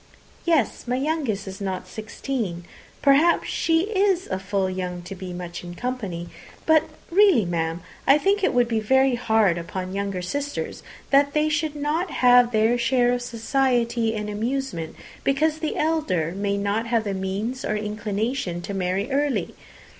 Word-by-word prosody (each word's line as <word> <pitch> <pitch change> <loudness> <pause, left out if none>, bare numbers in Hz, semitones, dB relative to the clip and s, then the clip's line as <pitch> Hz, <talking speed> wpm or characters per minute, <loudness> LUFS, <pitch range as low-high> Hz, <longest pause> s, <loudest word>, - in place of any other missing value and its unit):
"Yes, 320 -8 +1
my 245 - 0
youngest 265 -8 -1
is 190 +1 -7
not 190 -2 -3
sixteen. 215 -3 -4 0.4
Perhaps 295 +5 +4
she 325 0 +2
is 390 -2 +1
full 195 0 -1
young 180 -1 -4
to 180 - -7
be 185 -1 -7
much 175 -1 -6
in 175 0 -8
company. 200 -8 -4 0.4
But 315 -1 +5 0.3
really, 370 - +5
ma'am, 165 -1 -2 0.3
I 275 - +7
think 395 +5 +1
it - - +3
would 245 -1 +3
be 225 -2 0
very 265 +4 +3
hard 220 -7 +2
upon 185 +2 -5
younger 195 -2 -2
sisters 285 +10 -4 0.3
that 280 0 +4
they 305 0 +2
should 305 0 -1
not 300 +5 -1
have 245 -3 +5
their 225 +2 +3
share 245 0 +3
of 245 - -1
society 235 -1 0
and 210 -1 -3
amusement, 220 -5 -3 0.3
because 305 +3 +1
the 315 -1 -2
elder 300 - 0
may 200 0 -1
not 205 +3 -1
have 230 -1 +1
the 200 -2 -2
means 200 +7 -3
or 215 - -1
inclination 210 -2 -2
to 200 - -5
marry 195 +5 -1
early. 285 0 0
230 Hz, 160 wpm, -24 LUFS, 195-280 Hz, 0.4 s, I